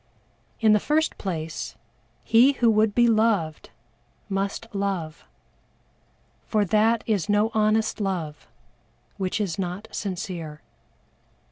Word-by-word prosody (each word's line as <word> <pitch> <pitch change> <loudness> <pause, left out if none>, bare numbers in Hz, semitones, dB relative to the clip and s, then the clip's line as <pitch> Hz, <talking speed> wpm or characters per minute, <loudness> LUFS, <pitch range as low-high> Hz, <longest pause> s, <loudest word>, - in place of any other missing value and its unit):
In 220 -2 +5
the 210 - +4
first 310 +7 0
place, 165 -5 -4 0.5
he 245 +5 +5
who 235 -3 +3
would 215 -1 +2
be 240 0 +5
loved 215 -9 +1 0.6
must 195 +2 -2
love 190 -6 -3 1.2
for 215 -2 +2
that 220 +3 +2
is 205 -3 0
no 210 +2 +2
honest 215 0 +1
love 175 -7 -3 0.7
which 190 +2 -2
is 195 -4 -2
not 185 +4 -4
sincere. 175 -6 -5
205 Hz, 110 wpm, -25 LUFS, 180-220 Hz, 1.2 s, In